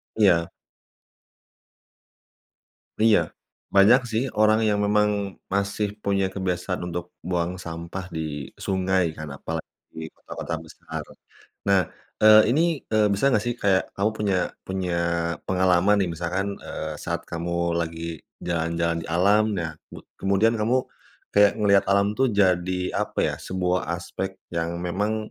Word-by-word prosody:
Iya. 90 -6 +4 2.5
Iya, 110 -2 +6 0.6
banyak 110 +7 +7
sih 110 +3 +1 0.2
orang 110 +1 +5
yang 105 -1 +2
memang 105 0 +3 0.4
masih 100 +1 0 0.2
punya 100 -1 +1
kebiasaan 90 -1 -2
untuk 85 0 -4 0.2
buang 90 0 0
sampah 85 +3 -6
di - - -2 0.5
sungai 95 -1 +1
kan, 75 0 -6
apalagi 80 +3 -5 0.3
di 80 - -5
kota-kota 85 - -6
besar. 80 - -8 0.6
Nah, 100 -1 +5 0.4
eee, 110 0 +9
ini, 155 +6 +3 0.3
eee, 110 -1 +4
bisa 135 +8 +2
nggak 105 -3 +2
sih, 120 - 0
kayak 95 -2 +4
kamu 100 +3 +1
punya 100 -3 +1 0.3
punya 95 -2 -2 0.5
pengalaman 95 +2 +3
nih 90 - -1
misalkan, 90 +4 -2 0.2
eee, 80 0 -5
saat - - -3
kamu 85 0 -1
lagi 80 0 -3 0.4
jalan-jalan 85 0 0
di - - -8
alam 100 +6 +4
nah 80 -2 -2 0.2
mud - - -12 0.2
kemudian 100 +4 +3
kamu 120 +4 +2 0.6
kayak 100 0 +6
ngelihat 100 -2 +4
alam 100 0 +4
tuh 135 - +4
jadi 90 -2 +2
apa - - -6
ya, - - +1
sebuah 90 -1 -1
aspek 95 +2 -5 0.2
yang 85 0 -2
memang, 105 +4 -2
95 Hz, 135 wpm, -24 LUFS, 85-105 Hz, 2.5 s, eee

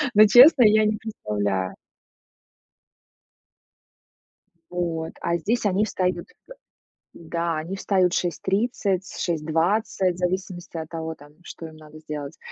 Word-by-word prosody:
но, 215 +1 +8
честно, 250 +5 +8
я 215 0 +5
не 215 0 0
представляю. 105 - -3 3.0
Вот, 165 -2 -3
а 170 0 -1
здесь 220 +7 -1
они 205 +1 +2
встают, 180 -4 -2 0.9
да, 170 0 -3
они 170 +5 -5
встают 185 -2 +1
в - - +3
6:30, 195 +2 -1
6:20, 175 +4 0
в 175 - -13
зависимости 180 -1 -3
от 160 -1 -5
того, 160 -1 -5
там, 145 +1 -17
что 165 - -9
им 160 -1 -13
надо 155 0 -14
сделать, 150 -2 -7
175 Hz, 120 wpm, -24 LUFS, 160-200 Hz, 3.0 s, но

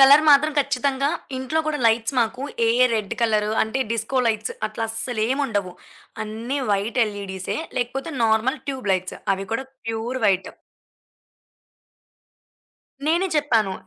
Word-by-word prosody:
Colour 280 +3 +8
మాత్రం 295 +2 +6
ఖచ్చితంగా 275 0 +1 0.3
ఇంట్లో 260 +5 -1
కూడా 305 -1 -1
లైట్స్ 225 +3 +2
మాకు 235 +3 -1 0.2
ఏ, - - +3 0.2
ఏ - - +6
రెడ్ 215 -3 -2
కలరు 215 -2 +2
అంటే, 220 +4 -2
డిస్కో 230 +4 -1
లైట్స్ 220 -1 0 0.2
అట్లా 225 +1 -4
అస్సలేముండవు. 225 -4 -1 0.5
అన్ని 230 +6 -4
వైట్ 205 +5 0
ఎల్‌ఈ‌డిసే. 200 -3 -4 0.2
లేకపోతే 270 +6 -3
నార్మల్ 220 +4 +2
ట్యూబ్ 255 -7 -2
లైట్స్. 185 0 -2 0.2
అవి 195 +1 -6
కూడా 230 +4 -1 0.2
ప్యూర్ 225 +3 -2
వైట్ 190 -1 +2 2.6
నేనే 340 +4 +3
చెప్పాను. 225 -10 +2
230 Hz, 125 wpm, -23 LUFS, 215-270 Hz, 2.6 s, Colour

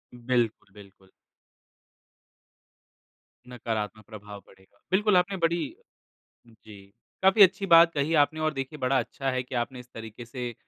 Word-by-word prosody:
बिल्कुल, 120 -4 -2
बिल्कुल। 100 -2 -17 2.4
नकारात्मक 110 -3 -5
प्रभाव 105 -2 -11
पड़ेगा। 95 +1 -23
बिल्कुल, 205 0 +3
आपने 190 +2 0
बड़ी 170 0 0 0.8
जी, 105 -3 -16 0.4
काफ़ी 195 +2 +7
अच्छी 195 +1 +3
बात 165 0 +8
कही 150 +2 -1
आपने 155 +2 -5
और 155 0 0
देखिए, 135 +2 -6
बड़ा 130 +1 +1
अच्छा 135 +3 -4
है 130 0 -2
कि 125 +1 -8
आपने 125 +1 -3
इस 125 - -14
तरीके 115 +1 -9
से 120 0 -6
125 Hz, 135 wpm, -26 LUFS, 110-160 Hz, 2.4 s, बात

